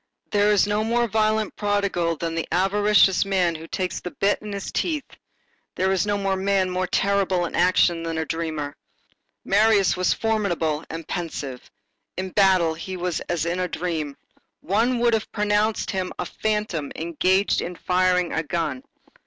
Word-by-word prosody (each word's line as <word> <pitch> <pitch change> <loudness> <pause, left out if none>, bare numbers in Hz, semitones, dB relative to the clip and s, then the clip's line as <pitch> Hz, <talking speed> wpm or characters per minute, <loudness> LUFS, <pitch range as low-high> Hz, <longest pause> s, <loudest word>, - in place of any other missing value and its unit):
There 205 0 +3
is 205 -1 +4
no 210 +1 0
more 235 +2 +1
violent 215 0 +1
prodigal 200 -5 0
than 165 +1 -3
the 165 0 -2
avaricious 195 +1 +4
man 190 -3 +1
who 160 0 -8
takes 185 0 -3
the 180 - -5
bit 200 +3 0
in 210 - -7
his 200 -1 -5
teeth; 310 -5 -1 0.7
there 190 +1 +1
is 190 +1 +1
no 205 0 +1 0.2
man 190 -1 +1
more 185 0 -1
terrible 195 -3 +1
in - - -6
action 175 -1 +3
than 165 -1 -3
a 160 - -1
dreamer. 155 -3 -3 0.7
Marius 205 -1 +4
was 185 0 +1
formidable 175 -9 0
and 165 0 -7
pensive. 145 -7 -5 0.5
In 185 0 -3
battle 185 -5 +4
he 185 +3 -6
was 180 -2 -2
as 170 -2 0
in 170 +2 -1
a 180 - 0
dream. 160 -5 -3 0.4
One 230 +7 +1
would 235 0 +2
have 220 -1 -1
pronounced 210 +1 0
him 185 -2 -2
a - - -3
phantom 210 -9 -2
engaged 185 +4 +1
in 180 - -5
firing 180 0 +1
a 160 - 0
gun. 155 -4 -2
185 Hz, 165 wpm, -23 LUFS, 170-205 Hz, 0.7 s, is